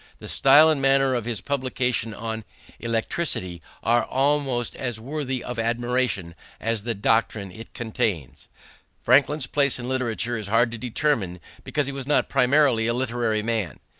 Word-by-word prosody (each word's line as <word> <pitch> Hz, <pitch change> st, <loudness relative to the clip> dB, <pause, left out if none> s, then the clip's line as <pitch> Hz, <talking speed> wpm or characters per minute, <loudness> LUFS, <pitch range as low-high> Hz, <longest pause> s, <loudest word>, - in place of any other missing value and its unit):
The -, -, -10 dB
style 145 Hz, +3 st, +6 dB
and 145 Hz, -3 st, 0 dB
manner 135 Hz, -1 st, +3 dB
of 120 Hz, -3 st, -2 dB
his 115 Hz, -5 st, -3 dB
publication 130 Hz, -4 st, -1 dB
on 110 Hz, 0 st, -5 dB, 0.4 s
electricity 115 Hz, -, -2 dB, 0.2 s
are 120 Hz, +1 st, +3 dB
almost 135 Hz, -2 st, 0 dB
as 120 Hz, -4 st, -4 dB
worthy 130 Hz, 0 st, -4 dB
of 125 Hz, -1 st, -5 dB
admiration 120 Hz, -6 st, -1 dB, 0.3 s
as 115 Hz, -1 st, -1 dB
the 115 Hz, +1 st, -3 dB
doctrine 105 Hz, -1 st, 0 dB
it 110 Hz, +4 st, -12 dB
contains." 105 Hz, -, -3 dB, 0.6 s
Franklin's 140 Hz, +3 st, +3 dB
place 140 Hz, -1 st, +2 dB
in 125 Hz, -1 st, -6 dB
literature 120 Hz, -2 st, -1 dB
is 105 Hz, -, -5 dB
hard 115 Hz, +3 st, +2 dB
to 120 Hz, -, -7 dB
determine 120 Hz, -7 st, -1 dB, 0.2 s
because 150 Hz, -, -1 dB
he 140 Hz, -, -3 dB
was 135 Hz, -1 st, -6 dB
not 150 Hz, -, +2 dB
primarily 130 Hz, -3 st, +3 dB
a 120 Hz, -, +1 dB
literary 120 Hz, -4 st, -1 dB
man. 110 Hz, -4 st, -2 dB
120 Hz, 155 wpm, -24 LUFS, 110-135 Hz, 0.6 s, style